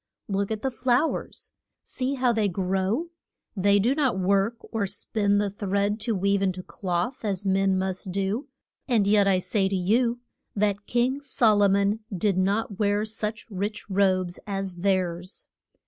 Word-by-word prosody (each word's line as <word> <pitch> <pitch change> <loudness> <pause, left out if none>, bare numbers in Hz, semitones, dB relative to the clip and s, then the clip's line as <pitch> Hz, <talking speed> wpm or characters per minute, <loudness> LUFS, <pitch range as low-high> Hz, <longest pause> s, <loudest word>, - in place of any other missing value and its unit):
Look 200 -1 -1
at 220 -1 -4
the 265 - 0
flow 245 +5 +2
ers. - - -8 0.3
See 265 +2 -2
how 250 -2 +2
they 220 -2 +1
grow. 190 - -1 0.5
They 200 +1 +3
do 230 +6 +3
not 275 -8 +1
work, 195 +4 +2 0.2
or 220 -4 -1
spin 205 +1 0
the 205 -1 0
thread 200 +1 -1
to 220 +1 -1
weave 200 +1 +1
in 195 -1 +2
to 185 0 -8
cloth 180 +8 -3
as 200 -2 -2
men 195 0 +2
must 190 0 -2
do, 200 +7 -2 0.4
and 230 -6 +3
yet 205 0 +4
I 190 -1 +4
say 190 +1 0
to 195 - -1
you 230 +6 +1 0.4
that 205 -1 0
King 250 +3 +1
Sol 225 -6 +3
o 200 - +6
mon 200 +2 +2
did 195 +1 +1
not 200 +1 0
wear 205 0 +1
such 220 0 -4
rich 205 +3 -3
robes 185 -2 +1
as 195 -2 -3
theirs. 185 -1 -1
200 Hz, 170 wpm, -26 LUFS, 190-220 Hz, 0.5 s, o